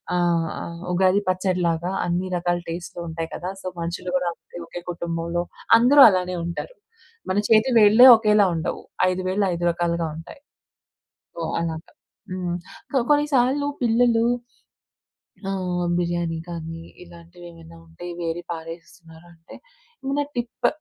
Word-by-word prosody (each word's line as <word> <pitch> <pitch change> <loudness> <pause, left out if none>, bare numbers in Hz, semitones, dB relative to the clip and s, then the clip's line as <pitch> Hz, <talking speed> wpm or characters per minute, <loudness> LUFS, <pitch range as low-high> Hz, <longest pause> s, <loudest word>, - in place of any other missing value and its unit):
ఆహ్, 170 -2 +1
ఆహ్, 170 0 -7
ఉగాది 185 +2 +3
పచ్చడిలాగా 180 -2 0
అన్ని 175 +2 -1
రకాల 175 0 0
టేస్ట్‌లు 175 +1 -6
ఉంటాయి 165 0 -5
కదా. 180 - -5
సో - - -6
మనుషులు 170 +2 -4
కూడా 180 -1 0
అంతే - - -15
ఒకే 175 - -8
కుటుంబంలో 170 0 -3 0.3
అందరూ 265 +5 +6
అలానే 185 -1 -1
ఉంటారు. 170 - -6 0.5
మన 185 - 0
చేతి 220 +3 +4
వేళ్ళే 220 +4 +8
ఒకేలా 210 -2 +3
ఉండవు 165 +1 -3 0.3
5 185 0 -2
వేల్లు 195 +2 +1
5 170 - -4
రకాలుగా 170 -1 -1
ఉంటాయి. 165 +11 -11 0.9
సో 170 - -8 0.2
అలాగా. 165 -1 -5 0.4
హ్మ్. 180 -1 -3 0.4
సో 275 - 0
కొన్ని 295 0 +4
సార్లు 265 +3 +2 0.2
పిల్లలు, 235 0 +3 1.3
ఆ! - - -1 0.5
బిర్యానీ 175 -1 -1
కానీ, 165 -1 -6 0.2
ఇలాంటివి 170 0 -15
ఏమైనా 165 0 -14
ఉంటే 165 +2 -11 0.2
వేరి 170 +1 -3
పారేస్తున్నారంటే 165 0 -11 0.5
ఏమైనా 280 +2 0
టిప్ 240 0 -1
175 Hz, 130 wpm, -23 LUFS, 170-200 Hz, 1.3 s, వేళ్ళే